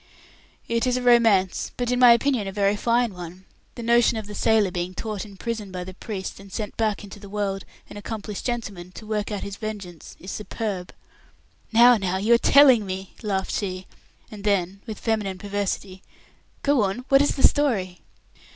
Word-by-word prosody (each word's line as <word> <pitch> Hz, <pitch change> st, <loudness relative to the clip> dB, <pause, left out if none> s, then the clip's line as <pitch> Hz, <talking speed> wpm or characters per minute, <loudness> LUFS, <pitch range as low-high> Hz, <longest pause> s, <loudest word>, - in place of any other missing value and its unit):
"It 230 Hz, +2 st, 0 dB
is 250 Hz, 0 st, +1 dB
a -, -, -2 dB
romance, 225 Hz, -7 st, +3 dB
but, 245 Hz, 0 st, -1 dB
in 250 Hz, -, +1 dB
my 245 Hz, -1 st, +8 dB
opinion, 235 Hz, -3 st, +1 dB
a -, -, -3 dB
very 200 Hz, +1 st, +1 dB
fine 235 Hz, 0 st, +1 dB
one. 180 Hz, +1 st, -10 dB, 0.3 s
The 235 Hz, -, -7 dB
notion 235 Hz, 0 st, +3 dB
of 220 Hz, -, -5 dB
the 210 Hz, -, -9 dB
sailor 215 Hz, -2 st, +2 dB
being 180 Hz, +1 st, -4 dB
taught 215 Hz, -2 st, -4 dB
in 200 Hz, -2 st, -13 dB
prison 220 Hz, -2 st, -4 dB
by 180 Hz, -1 st, -5 dB
the 185 Hz, +1 st, -9 dB
priest, 190 Hz, -1 st, -6 dB
and 195 Hz, 0 st, -13 dB
sent 210 Hz, -1 st, -5 dB
back 215 Hz, -2 st, -1 dB
into 205 Hz, 0 st, -10 dB
the 200 Hz, -1 st, -11 dB
world 195 Hz, -1 st, -3 dB, 0.2 s
an -, -, -10 dB
accomplished 210 Hz, -1 st, -6 dB
gentleman, 205 Hz, -7 st, -4 dB
to 215 Hz, -, -10 dB
work 215 Hz, 0 st, -2 dB
out 205 Hz, -, -4 dB
his 200 Hz, 0 st, -6 dB
vengeance, 200 Hz, -7 st, -7 dB
is 185 Hz, -, -8 dB
superb." 205 Hz, -4 st, -4 dB, 0.8 s
"No, 240 Hz, +1 st, +7 dB
now 190 Hz, -2 st, -1 dB
you 215 Hz, +5 st, +3 dB
are 235 Hz, -, +5 dB
telling 265 Hz, -4 st, +6 dB
me," 190 Hz, 0 st, -6 dB
laughed 195 Hz, -3 st, -2 dB
she; 185 Hz, -2 st, -3 dB, 0.5 s
and 210 Hz, -2 st, -9 dB
then, 195 Hz, -2 st, 0 dB
with 215 Hz, -2 st, -5 dB
feminine 210 Hz, -4 st, -1 dB
perversity, 200 Hz, -1 st, -4 dB, 0.6 s
"Go 285 Hz, -3 st, +3 dB
on, 205 Hz, +5 st, -2 dB
what 275 Hz, 0 st, +6 dB
is 285 Hz, -, +1 dB
the 270 Hz, -, +7 dB
story?" 205 Hz, -12 st, -1 dB
205 Hz, 190 wpm, -24 LUFS, 190-230 Hz, 0.8 s, my